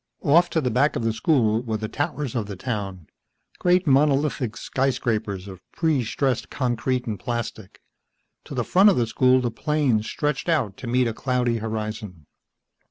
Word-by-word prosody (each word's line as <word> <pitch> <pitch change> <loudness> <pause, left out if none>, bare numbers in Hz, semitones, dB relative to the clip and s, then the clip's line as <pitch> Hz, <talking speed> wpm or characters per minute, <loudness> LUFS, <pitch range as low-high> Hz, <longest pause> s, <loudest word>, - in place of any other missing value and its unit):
Off 170 +5 +4
to 165 - 0
the 130 -5 -1
back 135 +6 +2
of - - -2
the 115 -1 +1
school 110 -2 +2
were 115 -3 -3
the 110 0 -4
towers 145 +1 -3
of 115 -5 -2
the 100 - -6
town, 95 -5 -4 0.5
great 180 0 +3
monolithic 140 -4 +2
skyscrapers 110 -7 -1
of 95 -2 -10
pre 155 -6 +1
stressed 130 +2 -1
concrete 125 0 -1
and 105 -4 -4
plastic. 115 -2 -5 0.7
To - - -8
the - - 0
front 195 +3 +6
of 200 - +2
the 120 - +2
school 130 +3 +3
the 120 -2 -1
plains 135 -7 0
stretched 150 +2 -2
out 125 - +1
to 125 - -8
meet 125 +1 +2
a 115 - -2
cloudy 125 -1 0
horizon. 105 -6 -5
125 Hz, 170 wpm, -24 LUFS, 110-140 Hz, 0.7 s, front